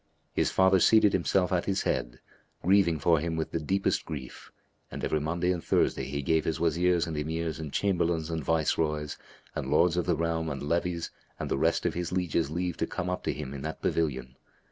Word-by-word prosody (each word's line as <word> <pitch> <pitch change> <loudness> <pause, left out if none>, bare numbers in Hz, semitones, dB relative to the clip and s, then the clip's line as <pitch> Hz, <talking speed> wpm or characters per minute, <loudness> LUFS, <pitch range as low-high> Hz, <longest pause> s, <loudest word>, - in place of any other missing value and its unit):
His - - +1
father 95 0 +4
seated 105 +2 +5
himself 95 +1 +1
at 90 -2 +1
his 95 -1 0
head, - - -2 0.4
grieving 95 -3 +4
for 80 +2 +3
him 80 +1 -2
with 80 -1 -3
the 85 - -1
deepest 95 +5 0
grief, 70 -5 -8 0.4
and - - -7
every 75 - +1
Monday 85 +4 0
and 85 -2 -2
Thursday - - +1
he 70 +1 -3
gave 80 +3 +2
his 80 0 -2
Wazirs 85 +1 +2
and 80 - -4
Emirs 80 +1 -2
and 75 -3 -5
Chamberlains 85 -4 0
and 80 -2 -2
Viceroys 75 -1 0 0.3
and - - -4
Lords 85 0 +3
of 90 - 0
the 85 - +3
realm 80 -1 -1
and 70 -2 -4
levies 85 +2 -1 0.3
and - - -4
the - - +1
rest - - +1
of - - +1
his 85 -1 -3
lieges 85 -4 0
leave 90 +2 -2
to - - -1
come 90 +1 -3
up 90 - -3
to - - +1
him 70 -2 -6
in 70 - -6
that 80 +2 -5
pavilion. 65 -5 -1
80 Hz, 210 wpm, -28 LUFS, 75-90 Hz, 0.4 s, seated